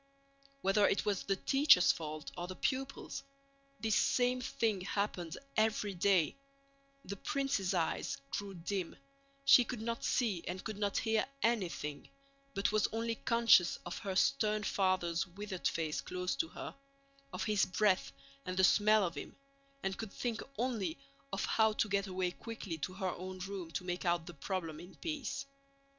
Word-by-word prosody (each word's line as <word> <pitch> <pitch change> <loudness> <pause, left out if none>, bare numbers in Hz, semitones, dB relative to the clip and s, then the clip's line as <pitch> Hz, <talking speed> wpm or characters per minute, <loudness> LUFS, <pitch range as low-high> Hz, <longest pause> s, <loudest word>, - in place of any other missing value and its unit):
Whether 200 +2 +4
it 200 - +1
was 205 -2 +1
the 195 - 0
teacher's 270 -2 +6
fault 155 -2 -6
or 175 - -4
the 185 - -6
pupil's, 270 +4 -2 0.6
this 220 -2 +1
same 250 0 +3
thing 220 -5 0
happened 185 -4 -2 0.2
every 215 -2 +2
day: 185 -3 +3 0.7
the 200 - -4
princess' 275 -9 0
eyes 165 -2 0
grew 200 -1 -4
dim, 180 +1 -3 0.5
she 255 -2 +9
could 240 -1 -5
not 230 +1 -3
see 210 -9 +1
and 185 +1 -4
could 215 -2 -5
not 205 -1 0
hear 220 -1 +2 0.2
anything, 175 -10 -1 0.5
but 200 +1 +1
was 215 -1 +3
only 230 +1 -1
conscious 230 -6 +4
of 175 - -4
her 195 -2 -3
stern 215 -2 +2
father's 185 -3 +1
withered 190 0 -3
face 160 -2 -1
close 180 0 -2
to 330 - +1
her, - - -7 0.6
of - - -3
his 210 -3 +2
breath 190 0 +2 0.3
and 185 0 -4
the 190 - +4
smell 215 +1 +5
of 170 - -3
him, 145 - -7 0.5
and 195 0 -2
could 220 -3 -5
think 235 0 -2 0.2
only 225 -10 -1 0.3
of 195 - -1
how 220 -1 +3
to 215 - +1
get 200 -1 0
away 185 -1 -1
quickly 220 -3 -6
to 185 - -3
her 190 -2 -1
own 185 +1 -6
room 185 -2 -5
to 160 +2 -3
make 180 0 -3
out 170 -2 +1
the 175 - -8
problem 165 0 -4
in 175 +3 -11
peace. 275 -4 -3
195 Hz, 165 wpm, -34 LUFS, 180-220 Hz, 0.7 s, she